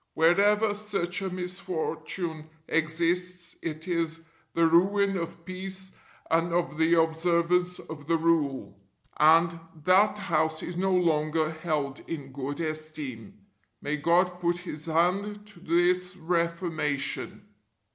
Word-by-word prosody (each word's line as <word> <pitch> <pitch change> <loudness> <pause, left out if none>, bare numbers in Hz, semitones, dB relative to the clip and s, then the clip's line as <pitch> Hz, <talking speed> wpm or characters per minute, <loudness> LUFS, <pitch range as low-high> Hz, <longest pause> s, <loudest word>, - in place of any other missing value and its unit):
Wherever 205 +6 +4
such 200 -3 -1
a 190 - -2
misfortune 180 -3 -4 0.2
exists 170 +2 -1
it 160 +1 -5
is 165 -2 -2 0.3
the 170 - +3
ruin 195 +4 +3
of 170 -1 -5
peace 190 +1 -7 0.4
and 165 +1 +2
of 170 -3 0
the 165 +1 +4
observance 170 +2 +2
of 150 -2 -10
the 165 0 +3
Rule, 140 -11 0 0.4
and 165 +2 +5 0.2
that 195 +5 +4
house 160 -5 0
is 175 - -5
no 190 +2 0
longer 155 -2 +1
held 155 -4 -2
in 145 -5 -5
good 140 +2 -5
esteem. 155 -9 -6 0.4
May 150 +1 -2
God 180 +4 +2
put 175 0 +1
His 170 -3 -7
hand 195 +6 0
to 205 -4 -14
this 180 +1 +1
reformation. 165 -4 -2
170 Hz, 120 wpm, -28 LUFS, 155-180 Hz, 0.4 s, and